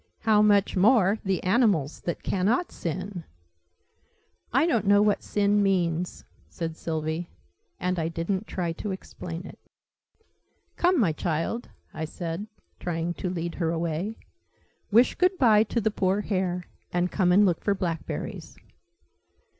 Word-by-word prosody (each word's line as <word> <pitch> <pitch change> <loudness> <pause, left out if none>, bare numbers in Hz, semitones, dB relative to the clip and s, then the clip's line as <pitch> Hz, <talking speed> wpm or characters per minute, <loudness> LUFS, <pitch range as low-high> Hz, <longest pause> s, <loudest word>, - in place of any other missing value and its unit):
How 215 -1 +4
much 205 -2 +4
more 205 +1 +4
the 190 -2 -1
animals, 185 - +2
that 170 - -3
cannot 215 - +1
sin!" 180 +2 -5 1.3
"I 270 +6 +4
don't 235 - +1
know 205 0 +6
what 210 -1 +2
'sin' 205 0 +2
means," 180 -3 0 0.2
said 165 -1 -4
Sylvie. 160 +1 -3 0.5
And 180 0 -1
I 160 - 0
didn't 175 +5 -2
try 175 -3 -2
to 190 +5 -5
explain 180 -2 -6
it. - - -11 1.2
"Come, 355 -1 +3
my 195 -9 +3
child," 165 +9 -2 0.2
I 160 - -3
said, 170 +5 -5 0.3
trying 170 0 -2
to 180 - -4
lead 170 -1 -3
her 165 - +2
away. 170 +5 -2 0.7
"Wish 235 +4 +5
good 365 +1 +2
bye 220 -7 +5
to 235 - -1
the 220 -1 +1
poor 195 0 +1
hare, 185 -3 -1 0.3
and 175 0 0
come 180 -3 +2
and 200 +3 +6
look 175 -4 +1
for 200 - +2
blackberries." 170 -4 -4
185 Hz, 140 wpm, -26 LUFS, 170-210 Hz, 1.3 s, know